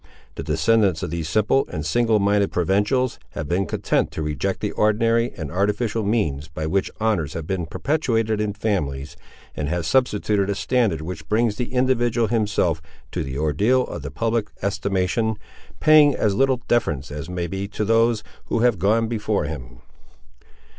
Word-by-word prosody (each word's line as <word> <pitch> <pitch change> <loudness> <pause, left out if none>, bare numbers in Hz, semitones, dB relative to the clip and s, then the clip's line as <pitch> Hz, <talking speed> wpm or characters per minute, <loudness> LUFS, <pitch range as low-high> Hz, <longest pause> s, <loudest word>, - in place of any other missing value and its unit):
The - - -6
descendants 105 -7 +2
of - - -3
these 85 -2 -3
simple 110 +8 +2
and 75 - -4
single 115 +6 +2
minded 100 0 +2
provincials 105 +8 +1
have 75 - -4
been 90 +3 0
content - - 0
to 80 - -3
reject 75 -3 -2
the - - -2
ordinary 115 +3 +2
and 80 -5 -5
artificial 105 +4 0
means 80 -10 0
by 80 0 -5
which 95 +4 0
honours 105 -9 0
have 80 -2 -4
been 90 -2 -2
perpetuated 115 - 0
in 105 -1 -1
families, 75 -9 -2 0.4
and 75 -1 -3
have 85 0 -1
substituted 105 -2 +1
a 100 - 0
standard 115 -9 +1
which 80 -1 -7
brings 110 -1 +1
the 125 - -3
individual 120 -2 +2
himself 100 -8 +1 0.3
to - - -2
the 65 0 -5
ordeal 105 - +2
of - - -6
the - - -5
public 115 -2 -1 0.2
estimation, 100 +2 0 0.4
paying 150 -2 +6
as 105 - +1
little 130 +2 +1
deference 75 - 0
as 75 +3 -6
may 90 -1 -2
be 95 +3 -4
to 105 +1 -3
those 115 0 +3 0.2
who 115 - -1
have 120 -5 +3
gone 110 +5 +2
before 105 -5 -1
him. 65 -5 -7
105 Hz, 165 wpm, -22 LUFS, 80-115 Hz, 0.4 s, paying